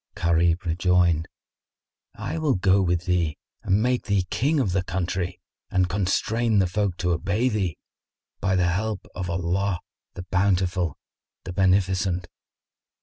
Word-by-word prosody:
Gharib 85 +1 +2
rejoined, 85 -1 +2 0.9
"I - - -4
will 155 -4 +2
go 95 +1 +3
with 90 -1 0
thee 85 -4 0 0.2
and 100 +3 +2
make 125 0 0
thee 100 -3 +1
king 145 +5 +1
of 110 -9 +1
the 95 +1 +1
country 90 0 -2 0.3
and 95 -2 +2
constrain 105 +4 +1
the 95 - +4
folk 95 0 -1
to 90 0 0
obey 100 +8 +1
thee, 95 -7 -1 0.6
by 95 -1 +1
the 90 -1 +2
help 105 +2 -2
of 90 -1 -4
Allah 90 +2 0 0.4
the 90 - -6
Bountiful, 90 -3 +1 0.5
the 90 - -6
Beneficent." 95 -1 +1
95 Hz, 140 wpm, -25 LUFS, 90-100 Hz, 0.9 s, the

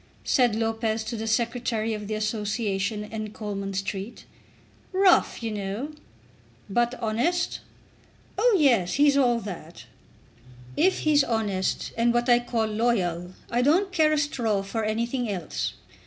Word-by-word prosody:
said 245 -5 +3
Lopez 225 0 -1
to 235 +2 -4
the 225 0 -4
Secretary 230 -1 0
of 210 -1 -5
the 215 - -2
Association 210 -1 -1
in 215 0 -6
Coleman 200 -2 -5
Street. 195 +3 -4 0.7
"Rough, 375 -9 +4
you 225 - -2
know." 210 +7 -4 0.8
"But 240 +4 +1
honest?" 245 +10 0 0.8
"Oh, 475 -5 +4
yes; 235 - +3
he's 285 0 +4
all 245 -4 +3
that." 175 -5 -8 0.9
"If 375 +1 +2
he's 295 -2 +4
honest, 210 -6 -1
and 235 +1 +2
what 240 +1 +1
I 240 0 +6
call 240 -2 -1
loyal, 195 -6 0 0.2
I 240 +1 +2
don't 350 +9 +3
care 315 -4 +3
a 305 - +2
straw 235 -9 0
for 220 +3 -3
anything 235 +3 -1
else. 180 -6 -3
225 Hz, 140 wpm, -26 LUFS, 210-245 Hz, 0.9 s, I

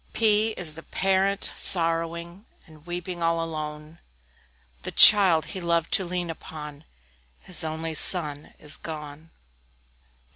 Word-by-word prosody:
P 220 0 +2
P - - -11
is 165 -4 +3
the 160 - -11
Parent, 195 +3 -2
sorrowing, 170 +3 +1 0.2
And 155 0 -20
weeping 175 0 -7
all 165 0 -1
alone 155 0 -8 0.8
The - - -7
child 190 -7 +6
he 190 - -7
loved 170 +1 -2
to 210 -6 0
lean 175 -1 -4
upon, 150 -2 -11 0.6
His 180 -2 0
only 160 +1 -5
son, 150 -2 +2
is 150 0 -6
gone! 155 0 -10
165 Hz, 125 wpm, -23 LUFS, 155-180 Hz, 0.8 s, child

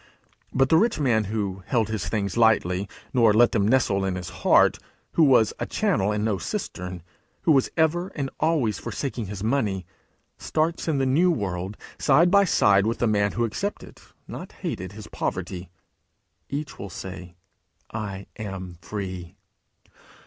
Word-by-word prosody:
But 135 0 +2
the 160 - +6
rich 220 -1 +2
man 115 -7 +2
who 100 -2 -3
held 115 -4 +1
his 110 -4 -3
things 100 -4 -1
lightly, 100 -4 +3 0.2
nor 115 -5 +5
let 120 +1 +6
them 105 -4 +2
nestle 110 -5 +2
in 95 -1 -1
his 90 -1 -5
heart; - - +5 0.3
who 165 - +3
was 125 -7 +5
a - - -2
channel 95 +2 +1
and 105 0 -1
no 105 -4 0
cistern; 90 +1 -5 0.4
who 165 - +4
was 135 -3 +4
ever 165 +3 +2
and 135 -3 -3
always 145 - +1
forsaking 125 -6 -4
his 100 0 -6
money 110 -7 0 0.5
starts, 160 +2 -1
in 155 -3 +1
the 135 - +1
new 155 +8 +3
world, 95 - -2 0.2
side 175 +2 +4
by 200 -1 +6
side 100 - +4
with 115 - 0
the - - +1
man 105 -2 +2
who 120 - +1
accepted, 200 - -5 0.3
not - - -8
hated, 95 +1 -4
his 105 0 -9
poverty. 90 -3 -4 0.8
Each 140 0 -5
will 100 - -6
say, 90 -1 -8 0.6
'I 100 -3 -5
am 95 -4 -6
free!' 95 -4 -6
110 Hz, 160 wpm, -25 LUFS, 95-135 Hz, 0.8 s, the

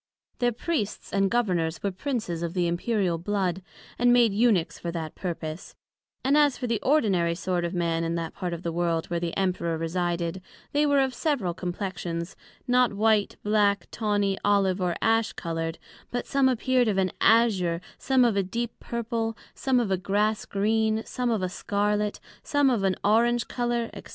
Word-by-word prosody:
Their 245 -1 +2
Priests 235 - -3
and 195 -1 +2
Governors 175 -9 0
were 200 - 0
Princes 200 - -3
of 170 +1 -3
the 180 -1 +2
Imperial 175 0 0
Blood, 190 -1 -1 0.4
and 245 0 +5
made 240 -4 +5
Eunuches 210 -6 +2
for 170 - -4
that 165 -2 -4
purpose; 165 -2 -5 0.5
and 270 +2 +3
as 295 -3 +4
for 255 - -4
the 230 -3 0
ordinary 195 - +2
sort 180 0 -1
of 170 +2 -3
men 165 -1 0
in 165 0 -1
that 165 -1 -3
part 180 -2 -4
of 170 +1 -5
the 170 - -2
World 170 0 -1
where 170 - 0
the 170 -1 -3
Emperor 180 -3 0
resided, 170 +1 -2 0.3
they 295 +1 +2
were 285 -1 +4
of 265 -1 +1
several 250 - -1
Complexions; 175 -1 -4 0.3
not 250 -2 +3
white, 215 0 +2
black, 205 -1 +2
tawny, 205 -3 0
olive 195 -2 +2
or 175 -2 0
ash 225 0 +2
coloured; 165 -1 -3 0.3
but 245 - -3
some 275 -1 +3
appear'd 255 0 +2
of 205 -3 +1
an 185 -1 +1
Azure, 195 -7 +4 0.2
some 260 -2 +3
of 230 -4 +2
a 200 - +3
deep 230 +5 -3
Purple, 230 -1 -3 0.2
some 260 -2 +1
of 225 -5 -1
a 190 - +2
Grass 205 +3 0
green, 220 +2 +1
some 250 -1 -2
of 220 -5 0
a - - +1
Scarlet, 205 +2 -1 0.2
some 285 -2 +2
of 225 -5 0
an 190 -1 +2
Orange 235 +3 +3
colour, 240 -1 -1
&c. - - -7
200 Hz, 180 wpm, -26 LUFS, 175-235 Hz, 0.5 s, and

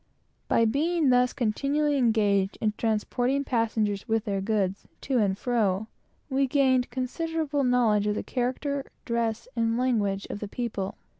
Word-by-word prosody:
By 230 - +3
being 300 +4 +2
thus 250 0 +4
continually 285 +5 0
engaged 210 -6 +2
in 215 -1 0
transporting 245 +5 0
passengers 220 -5 0
with 225 -1 0
their 200 -2 -1
goods, 195 -2 -1
to 265 -3 0
and 195 -3 +1
fro, 215 -4 0 0.4
we 270 0 +1
gained 260 -2 +2
considerable 290 +3 -2
knowledge 230 -5 +3
of 210 - +1
the - - -3
character, 270 +3 -2 0.2
dress, 230 -1 -1
and 230 0 +1
language 215 -6 0
of - - -5
the 210 - -5
people. 210 -3 -4
235 Hz, 145 wpm, -27 LUFS, 210-265 Hz, 0.4 s, thus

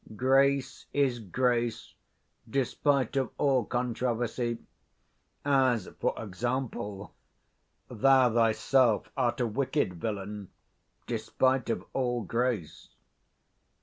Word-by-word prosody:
Grace 135 +2 +2
is 135 -4 +1
grace, 120 +2 -1 0.6
despite 135 +1 +1
of 135 -3 +1
all 135 -4 +2
controversy: 120 -1 -1 0.9
as, 130 -6 +2
for - - 0
example, 110 -1 -4 0.7
thou 125 +1 +4
thyself 115 +1 +2
art 120 -1 0
a 125 - +2
wicked 130 +1 0
25 85 -2 -12
villain, 105 -2 -4 0.6
despite 120 +2 0
of 115 - -2
all 120 -3 -1
grace. 115 -10 -3
120 Hz, 90 wpm, -29 LUFS, 110-130 Hz, 0.9 s, thou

